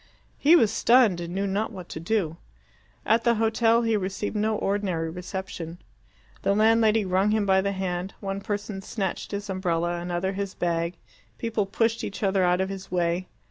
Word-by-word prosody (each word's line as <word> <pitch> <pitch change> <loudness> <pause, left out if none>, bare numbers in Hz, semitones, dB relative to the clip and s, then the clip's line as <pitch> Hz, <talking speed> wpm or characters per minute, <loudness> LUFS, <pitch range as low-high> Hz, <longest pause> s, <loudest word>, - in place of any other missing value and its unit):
He 310 +4 +6
was 225 -11 +4
stunned 230 -6 +4
and 170 +1 -5
knew 195 +1 0
not 200 +3 -1
what 185 -4 -9
to - - -6
do. 165 -2 -1 0.7
At 225 +2 +3
the 235 -1 +3
hotel 225 +1 +3
he 225 -1 +2
received 195 +2 -3
no 215 +1 +1
ordinary 190 -6 -1
reception. 180 -1 -6 0.6
The 200 - +2
landlady 220 0 +4
wrung 190 +2 +2
him 215 -1 +2
by 190 -1 +4
the 200 +1 -1
hand; 185 0 -3
one 195 -1 -4
person 205 -1 -4
snatched 195 -2 -3
his 200 0 -4
umbrella, 175 -3 -1
another 175 +2 -2
his 200 0 -4
bag; 170 0 -1 0.4
people 225 -3 -1
pushed 225 +3 0
each 205 - -5
other 195 -1 +2
out 180 +1 +3
of 190 - -1
his 195 -1 -7
way. 175 0 0
195 Hz, 180 wpm, -26 LUFS, 180-215 Hz, 0.7 s, He